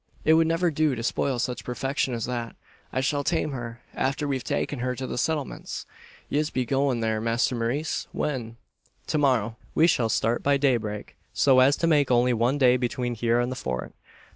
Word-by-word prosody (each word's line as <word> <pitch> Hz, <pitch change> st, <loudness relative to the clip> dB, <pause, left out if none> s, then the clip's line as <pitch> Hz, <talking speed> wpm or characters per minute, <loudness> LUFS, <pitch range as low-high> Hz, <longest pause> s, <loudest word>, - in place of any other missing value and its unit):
It 160 Hz, -, +6 dB
would 160 Hz, 0 st, +4 dB
never 165 Hz, +1 st, +1 dB
do 150 Hz, -2 st, +1 dB
to 115 Hz, -, -5 dB
spoil 130 Hz, +2 st, 0 dB
such 125 Hz, +1 st, -2 dB
perfection 135 Hz, +1 st, -1 dB
as 115 Hz, -, -2 dB
that. 120 Hz, -2 st, -4 dB, 0.4 s
I 130 Hz, -, 0 dB
shall 145 Hz, +1 st, 0 dB
tame 160 Hz, -1 st, 0 dB
her, 120 Hz, -2 st, -6 dB
after 135 Hz, +2 st, -1 dB
we've 135 Hz, -3 st, -2 dB
taken 145 Hz, -, -2 dB
her 125 Hz, +1 st, -1 dB
to 130 Hz, +2 st, -5 dB
the -, -, -4 dB
Settlements." 150 Hz, +2 st, -3 dB, 0.4 s
"Yez 150 Hz, +1 st, 0 dB
be 130 Hz, -4 st, -1 dB
goin' 135 Hz, -1 st, +1 dB
there, 110 Hz, -1 st, 0 dB
masther 115 Hz, +2 st, +1 dB
Maurice? 125 Hz, +7 st, -2 dB
When?" 120 Hz, -6 st, -3 dB, 0.5 s
"To 155 Hz, -, 0 dB
morrow. 120 Hz, -6 st, +1 dB, 0.2 s
We 160 Hz, -, +5 dB
shall 125 Hz, -9 st, +2 dB
start 115 Hz, +2 st, +1 dB
by 140 Hz, 0 st, +3 dB
daybreak, 115 Hz, -7 st, -1 dB, 0.2 s
so 135 Hz, -2 st, +5 dB
as 135 Hz, +2 st, +5 dB
to -, -, 0 dB
make 150 Hz, -4 st, +3 dB
only 125 Hz, 0 st, +3 dB
one 120 Hz, +4 st, +1 dB
day 125 Hz, -2 st, +5 dB
between 125 Hz, 0 st, -2 dB
here 115 Hz, +1 st, +1 dB
and 120 Hz, +1 st, 0 dB
the -, -, -3 dB
Fort." 65 Hz, -, -4 dB
130 Hz, 195 wpm, -26 LUFS, 120-145 Hz, 0.5 s, It